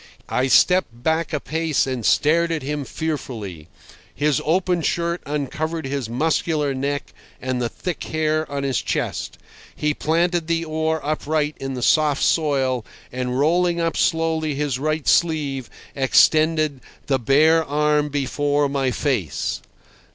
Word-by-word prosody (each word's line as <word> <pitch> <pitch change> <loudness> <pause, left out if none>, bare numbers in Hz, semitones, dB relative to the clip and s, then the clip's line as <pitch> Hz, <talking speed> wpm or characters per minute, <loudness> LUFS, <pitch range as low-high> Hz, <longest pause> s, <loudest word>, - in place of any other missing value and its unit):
I 130 +1 +1
stepped 130 -6 +3
back 160 0 0
a 150 - -1
pace 160 0 0
and 130 -3 -3
stared 160 - +3
at 160 -3 -2
him 145 0 -3
fearfully. 115 - -5 0.5
His 145 -1 +1
open 180 +1 +1
shirt 170 +2 -1
uncovered 155 +3 -3
his 135 -4 -3
muscular 150 +2 0
neck 140 +2 -3 0.3
and 130 -1 -2
the 120 - -1
thick 180 +4 -5
hair 155 -1 -1
on 140 -1 -2
his 135 -3 0
chest. - - -3 0.4
He 150 0 0
planted 170 +2 0
the 165 0 0
oar 160 0 -1
upright 150 0 -1
in 135 -1 -4
the 125 - -4
soft 150 0 +3
soil, 135 -6 +1 0.3
and 125 0 -2
rolling 170 +4 +2
up 165 -1 0
slowly 160 -2 +1
his 140 -3 -1
right 155 +1 -1
sleeve, 145 -7 +1 0.3
extended 155 +1 +3 0.2
the 135 -2 +1
bare 155 +7 +4
arm 150 0 +1
before 145 +1 0
my 135 -1 0
face. 120 - -2
150 Hz, 140 wpm, -22 LUFS, 135-160 Hz, 0.5 s, bare